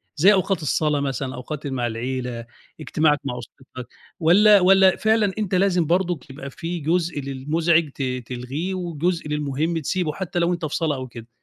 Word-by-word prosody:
زي 195 +7 +6
أوقات 190 -2 0
الصلاة 150 0 +1
مثلًا، 135 -1 -3
أوقات 145 +4 -7
اللي 135 -2 -3
مع 120 -2 -1
العيلة، 120 0 -4 0.3
اجتماعك 155 -1 +1
مع 125 -3 -3
أسرتك، 125 +1 -11 0.3
والّا 200 +5 +6
والّا 190 0 +5
فعلًا 220 -2 +2
أنت 200 -3 -1
لازم 180 -3 +2
برضُك 175 -2 0
تبقى 140 -1 -9
في 170 +5 -5
جزء 165 +1 0
للمزعج 155 +4 +1
ت 135 - -9 0.3
تلغيه، 135 +9 -4
وجزء 175 -2 -2
للمهم 150 +2 -1
تسيبه 160 +1 -2
حتى 180 0 -3
لو 170 +1 +2
أنت 170 -2 -3
في 150 - -3
صلاة 160 -3 0
أو 130 -1 -6
كده؟ 115 -2 -11
155 Hz, 175 wpm, -22 LUFS, 135-180 Hz, 0.3 s, زي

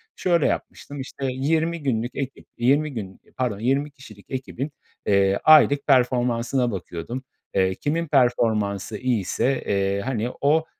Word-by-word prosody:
şöyle 170 -4 +2
yapmıştım, 145 -1 -4
işte, 135 +1 -6
20 160 +5 0
günlük 120 -2 -1
ekip, 135 -1 -5
20 140 +5 +2
gün 95 -5 -7 0.2
pardon, 120 -6 -1
20 135 +5 0
kişilik 110 -7 -15
ekibin, 130 +2 -4 0.3
eee, 100 -1 +3
aylık 145 -2 +6
performansına 125 -1 +2
bakıyordum. 95 +6 -6 0.3
Eee, 95 -1 +2
kimin 165 - -1
performansı 110 -7 +1
iyiyse, 125 +2 0
eee, 100 0 0
hani, 120 0 -2
o, 155 +3 +3
125 Hz, 130 wpm, -23 LUFS, 105-140 Hz, 0.3 s, aylık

